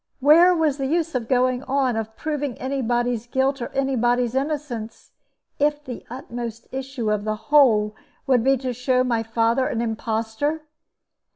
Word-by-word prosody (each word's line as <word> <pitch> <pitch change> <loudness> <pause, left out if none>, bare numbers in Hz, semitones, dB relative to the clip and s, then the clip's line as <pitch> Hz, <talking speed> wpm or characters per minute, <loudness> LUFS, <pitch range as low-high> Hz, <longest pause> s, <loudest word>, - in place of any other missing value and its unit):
Where 330 +6 +6
was 310 -4 +1
the 270 - -1
use 330 +2 0
of 245 -3 -2
going 255 0 +2
on, 265 -2 +1
of 220 0 -4
proving 290 -4 -3
any 270 +1 -2
body's 240 -1 -1
guilt 265 +2 0
or 235 - -2
any 270 0 -1
body's 240 0 +1
innocence, 265 -5 -4 0.5
if 295 +1 +1
the 250 -3 -7
utmost 235 -2 -6
issue 260 -4 -3
of 210 -1 0
the 215 0 -1
whole 220 -5 +3 0.3
would 255 -4 +3
be 270 +1 +3
to 255 0 -3
show 250 +1 +1
my 235 -3 0
father 230 +3 +1
an 230 - -2
impostor? 225 +6 -2
255 Hz, 165 wpm, -23 LUFS, 230-275 Hz, 0.5 s, Where